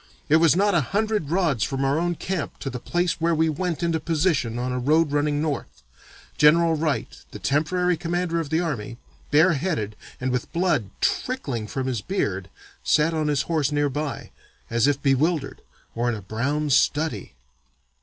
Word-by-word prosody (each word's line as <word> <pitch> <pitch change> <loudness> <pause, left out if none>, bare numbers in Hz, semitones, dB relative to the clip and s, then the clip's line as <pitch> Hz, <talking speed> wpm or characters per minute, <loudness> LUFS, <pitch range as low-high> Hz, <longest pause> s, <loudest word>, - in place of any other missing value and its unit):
It 155 - +6
was 165 -1 +4
not 205 +2 +3
a 170 - +4
hundred 205 - -1
rods 160 - +1
from 135 0 -1
our 140 +3 +2
own 175 0 0
camp 180 -1 -4
to 135 - -3
the 125 - -5
place 175 +5 -1
where 165 0 +2
we 160 +1 +2
went 170 +2 -2
into 165 -1 +1
position 150 -7 0
on 125 +1 -2
a 125 - -1
road 150 +4 +2
running 145 0 +1
north. 145 - -4 0.6
General 165 +2 +5
Wright, 155 -1 -2
the - - -8
temporary 180 +5 +1
commander 175 0 -1
of 160 -4 -4
the 160 +1 +1
army, 120 -8 -4 0.3
bareheaded, 150 - +2 0.2
and 130 0 -1
with 125 0 -2
blood 170 - +1
trickling 135 - -1
from 130 +4 -3
his 125 -5 -2
beard, 100 - -2 0.3
sat 155 +2 +3
on 155 -1 0
his 145 -2 +1
horse 155 -4 0
near 145 0 +1
by, 145 +1 -4 0.4
as 120 +2 +3
if 145 -1 +1
bewildered 140 +2 +1 0.3
or 120 +1 0
in 120 - -1
a 105 - -7
brown 140 +9 -1
study. 145 - +1
150 Hz, 175 wpm, -24 LUFS, 135-170 Hz, 0.6 s, It